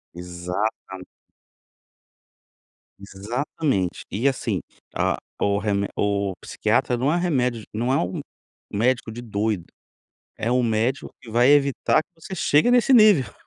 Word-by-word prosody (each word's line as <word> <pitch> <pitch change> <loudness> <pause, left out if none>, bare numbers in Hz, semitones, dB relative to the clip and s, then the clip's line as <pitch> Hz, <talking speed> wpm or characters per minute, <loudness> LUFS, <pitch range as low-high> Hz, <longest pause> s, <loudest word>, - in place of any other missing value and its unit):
Exatam 90 +2 -4 2.0
Exatamente, 100 - -3
e 115 +8 0
assim 115 -8 -1 0.3
a - - +1 0.2
o 100 0 +2
remé 100 -1 0
o 100 -1 0
psiquiatra 125 - 0
não 130 +5 +1
é - - +2
remédio 125 -10 0
não 120 +4 -1
é 135 - +3
um 90 +2 -2 0.5
médico 120 +2 0
de 120 +2 -7
doido, 105 -4 -2 0.7
é 115 - -1
um 125 0 +3
médico 115 +4 0
que 115 - -12
vai 120 +4 +4
evitar 140 +1 +3
que - - -70
você 190 - -7
chegue 150 +8 +3
nesse 245 +2 +4
nível. 205 - +5
115 Hz, 130 wpm, -23 LUFS, 100-135 Hz, 2.0 s, nível